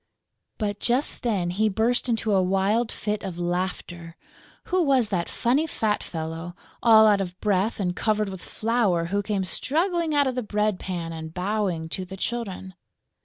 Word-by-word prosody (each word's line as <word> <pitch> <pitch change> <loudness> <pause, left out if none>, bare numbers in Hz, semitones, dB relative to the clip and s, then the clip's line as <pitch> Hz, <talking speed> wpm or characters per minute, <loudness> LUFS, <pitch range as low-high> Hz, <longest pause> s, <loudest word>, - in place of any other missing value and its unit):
But 205 -2 -2
just 250 +4 0
then 195 -7 0
he 215 +4 +2
burst 235 +5 +1
into 225 -2 +1
a 190 - +4
wild 195 +5 +1
fit 210 -1 -3
of 185 -3 -5
laughter! 175 -1 -3 0.5
Who 370 -3 +1
was 265 -8 +3
that 175 -3 -1
funny 270 +7 +1
fat 215 -8 0
fellow, 165 +1 -5 0.3
all 220 -2 +7
out 205 -2 +4
of 180 -1 -5
breath 205 +1 +1
and 180 -3 -1
covered 215 -1 0
with 190 -2 -7
flour, 215 -7 0
who 205 - +2
came 200 -1 -1
struggling 330 - 0
out 285 -1 +4
of 260 - 0
the 250 - -2
bread 210 -2 0
pan 170 -3 -4
and 160 0 -7
bowing 185 -2 -1
to 185 - -3
the 190 +1 -9
children? 195 -4 -4
205 Hz, 170 wpm, -25 LUFS, 180-230 Hz, 0.5 s, all